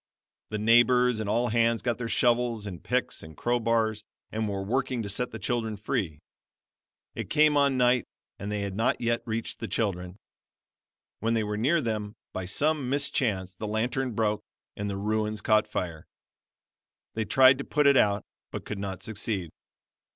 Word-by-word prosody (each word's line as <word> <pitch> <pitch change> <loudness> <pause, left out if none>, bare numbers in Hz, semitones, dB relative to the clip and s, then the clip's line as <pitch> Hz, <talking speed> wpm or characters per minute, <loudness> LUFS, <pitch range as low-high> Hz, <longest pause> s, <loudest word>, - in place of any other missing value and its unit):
The 105 - -2
neighbors 120 +2 +4
and 105 -2 -3
all 120 +3 +1
hands 115 0 +2
got 120 -1 -1
their 120 - -3
shovels 120 -3 +2
and 95 -4 -7
picks 125 0 -1
and 80 -1 -12
crowbars 115 -2 +1 0.3
and 110 -1 -1
were 100 -1 -3
working 125 +2 -1
to 100 - -4
set 125 +5 -1
the - - -7
children 110 0 -2
free. 100 - -2 1.0
It - - -5
came 150 -1 +4
on 140 -2 +3
night 125 0 +3 0.3
and 100 +2 -4
they 105 -1 -1
had 100 -1 -3
not 115 +3 +1
yet 120 0 0
reached 115 0 -3
the 115 - -4
children. 90 -5 -2 1.0
When 115 +2 +1
they 110 - +1
were 105 0 -2
near 145 +10 +2
them, 110 -4 -3 0.2
by 95 - -3
some 145 +6 0
mischance 120 - 0
the 105 +4 -6
lantern 120 +3 -1
broke, 105 -1 +1 0.3
and 100 0 -3
the 100 - -3
ruins 105 +1 -1
caught 110 0 +3
fire. 85 -3 -4 1.1
They 110 0 -2
tried 130 +3 +6
to - - -2
put 150 +1 +1
it 140 0 +6
out, 100 -5 +3 0.2
but - - -6
could 105 - -5
not 95 -2 -5
succeed. 105 -5 -3
110 Hz, 175 wpm, -28 LUFS, 105-125 Hz, 1.1 s, tried